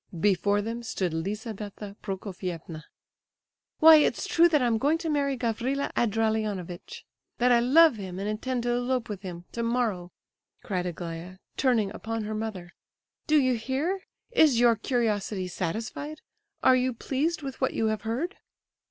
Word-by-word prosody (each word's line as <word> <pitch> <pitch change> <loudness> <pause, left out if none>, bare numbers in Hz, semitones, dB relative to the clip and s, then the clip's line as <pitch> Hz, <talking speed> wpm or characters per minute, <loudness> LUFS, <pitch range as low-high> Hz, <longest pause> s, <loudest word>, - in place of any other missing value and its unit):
Before 205 +2 +2
them 230 +2 -4
stood 190 -7 -2
Lizabetha 205 +3 -5
Prokofievna. 180 -5 -6 0.9
"Why, 320 0 +9
it's 300 - +2
true 340 +1 +5
that 305 -3 +3
I 250 - +1
am 230 -2 +2
going 295 +6 +2
to 325 0 -4
marry 280 -2 0
Gavrila 245 +4 -1
Ardalionovitch, 215 -5 -1 0.3
that 245 +1 +3
I 240 - +6
love 275 +2 +6
him 185 -3 -6
and 200 +2 -3
intend 240 +3 -2
to 240 - 0
elope 245 0 -1
with 200 -3 -5
him 175 -3 -7
tomorrow," 230 -6 -1 0.5
cried 180 -2 -2
Aglaya, 170 +1 -6 0.2
turning 235 -7 +2
upon 225 +1 -4
her 215 +1 -4
mother. 215 -5 -5 0.6
"Do 305 - +4
you 255 -2 +3
hear? 270 - -1 0.3
Is 310 - +5
your 240 -1 +5
curiosity 210 -6 -1
satisfied? 220 - -4 0.4
Are 260 - +6
you 255 0 +1
pleased 295 +7 -1
with 270 -1 -6
what 260 - +1
you 225 - +1
have 215 - -5
heard?" 250 - -3
225 Hz, 150 wpm, -27 LUFS, 195-260 Hz, 0.9 s, Why